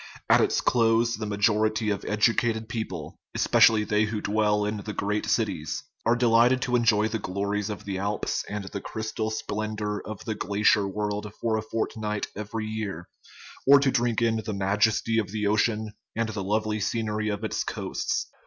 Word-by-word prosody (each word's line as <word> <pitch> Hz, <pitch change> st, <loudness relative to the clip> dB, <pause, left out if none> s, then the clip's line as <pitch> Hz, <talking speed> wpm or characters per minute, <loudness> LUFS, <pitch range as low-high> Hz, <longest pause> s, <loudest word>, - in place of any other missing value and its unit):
At -, -, +7 dB
its -, -, +2 dB
close 115 Hz, 0 st, +3 dB
the 110 Hz, 0 st, -4 dB
majority 105 Hz, +1 st, +1 dB
of 100 Hz, -, -3 dB
educated 110 Hz, +1 st, +1 dB
people 110 Hz, -9 st, -5 dB, 0.2 s
especially 110 Hz, -2 st, +5 dB
they 105 Hz, +1 st, +2 dB
who 110 Hz, 0 st, -3 dB
dwell 105 Hz, 0 st, +1 dB
in 105 Hz, +1 st, -2 dB
the 105 Hz, +1 st, -6 dB
great 105 Hz, +2 st, -1 dB
cities -, -, -1 dB, 0.2 s
are 120 Hz, -, +5 dB
delighted 120 Hz, +1 st, +4 dB
to 125 Hz, -, 0 dB
enjoy 110 Hz, -3 st, +3 dB
the 110 Hz, 0 st, -3 dB
glories 100 Hz, +2 st, -2 dB
of 105 Hz, -, -6 dB
the 95 Hz, -2 st, -3 dB
Alps 100 Hz, +1 st, -1 dB
and 105 Hz, -1 st, -4 dB
the 100 Hz, +1 st, -6 dB
crystal 110 Hz, 0 st, -3 dB
splendor 105 Hz, -1 st, -3 dB
of 110 Hz, -2 st, -8 dB
the 110 Hz, -, -1 dB
glacier 105 Hz, 0 st, +2 dB
world 105 Hz, +1 st, -3 dB
for 115 Hz, -1 st, 0 dB
a 110 Hz, -, 0 dB
fortnight 110 Hz, -1 st, -2 dB
every 105 Hz, +2 st, -4 dB
year, 105 Hz, -6 st, -5 dB, 0.6 s
or 140 Hz, +1 st, +9 dB
to 140 Hz, -1 st, +2 dB
drink 120 Hz, -3 st, +1 dB
in 115 Hz, -1 st, +2 dB
the 110 Hz, -1 st, -4 dB
majesty 105 Hz, +3 st, +2 dB
of 105 Hz, -, -1 dB
the 105 Hz, 0 st, -2 dB
ocean 105 Hz, +1 st, +1 dB, 0.2 s
and 115 Hz, 0 st, 0 dB
the 105 Hz, -3 st, -4 dB
lovely 110 Hz, +2 st, 0 dB
scenery 105 Hz, 0 st, -1 dB
of 105 Hz, +1 st, -3 dB
its 110 Hz, -, -1 dB
coasts. -, -, -2 dB
110 Hz, 175 wpm, -26 LUFS, 105-110 Hz, 0.6 s, or